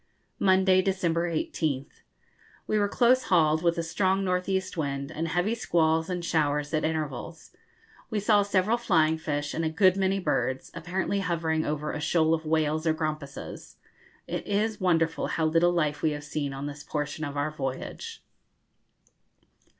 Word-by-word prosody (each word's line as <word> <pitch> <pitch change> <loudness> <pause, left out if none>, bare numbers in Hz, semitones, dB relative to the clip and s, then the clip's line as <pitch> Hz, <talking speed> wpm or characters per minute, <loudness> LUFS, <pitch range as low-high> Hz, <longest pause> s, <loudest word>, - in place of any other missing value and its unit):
Monday, 190 -1 +4
December 175 -3 0
18th. 155 -4 -2 0.6
We 215 - +1
were 205 - +2
close 250 +3 +3
hauled, 160 -3 +3
with 170 0 +1
a 170 - 0
strong 190 +3 +1
north 180 0 0
east 190 -1 -1
wind, 140 -2 -3
and 160 +1 -3
heavy 175 +6 0
squalls 160 -6 +1
and 180 -1 -3
showers 150 -3 0
at 155 - +1
intervals. 150 -9 -4 0.6
We 215 - -1
saw 205 0 +4
several 200 +3 +2
flying 160 -8 +2
fish 145 -2 -2
and 165 - -2
a 160 - +1
good 185 +3 +4
many 195 0 +1
birds, 140 -6 -1
apparently 180 +4 -2
hovering 165 -4 -1
over 150 0 -2
a 150 - -4
shoal 160 +1 +2
of 160 -1 -2
whales 155 0 +1
or 160 - +3
grampuses. 155 -3 -5 0.5
It - - -5
is 210 +1 0
wonderful 165 -3 +1
how 160 - 0
little 165 +2 +3
life 155 -4 0
we 155 - +1
have 145 0 -6
seen 145 -1 -3
on 135 +1 -5
this 145 0 -7
portion 150 0 -3
of 145 -1 -4
our 145 +2 0
voyage. 155 - -5
160 Hz, 165 wpm, -27 LUFS, 150-185 Hz, 0.6 s, Monday